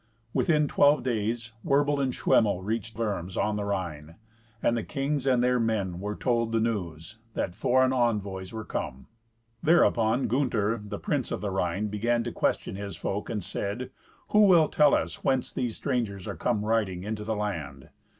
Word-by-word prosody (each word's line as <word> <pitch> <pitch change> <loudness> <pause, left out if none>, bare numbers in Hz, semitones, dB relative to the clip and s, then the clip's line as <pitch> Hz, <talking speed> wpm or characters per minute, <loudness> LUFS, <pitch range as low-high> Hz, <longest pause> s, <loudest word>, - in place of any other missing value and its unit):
Within 150 -4 +2
twelve 145 -2 +4
days 115 -1 -2
Werbel 145 +1 +2
and 135 -2 +1
Schwemmel 100 -6 +2
reached 110 +2 -3
Worms 95 -5 -3
on 105 0 +1
the 105 - -2
Rhine. 85 -6 -4 0.5
And 120 - +3
the 115 - 0
king 140 +5 -1
sand 130 -2 +2
their 125 0 +3
men 100 -6 -1
were 105 +2 -3
told 115 -2 0
the 115 - +2
news, 105 -3 -3 0.2
that 90 - -1
foreign 130 +6 +2
envoys 100 -7 -1
were 110 -1 -6
come. 65 +1 -4 0.6
Thereupon 125 -7 +3
Gunther, 115 -4 0
the 105 - -5
prince - - -1
of - - -3
the 105 -2 -2
Rhine, 95 +2 -1
began 115 +3 0
to - - -4
question - - -1
his 100 -4 -6
folk, 100 +3 -3
and 105 -4 -3
said, 115 +9 -4 0.4
"Who 210 -1 +6
will 170 -5 +6
tell 150 -2 +5
us - - -3
whence 130 -2 0
these 120 -3 -2
strangers 115 -9 -2
are - - -4
come 105 -4 -1
riding 105 -5 0
into 105 +1 -4
the 110 +1 -2
land?" 80 -10 -4
110 Hz, 175 wpm, -27 LUFS, 100-125 Hz, 0.6 s, Who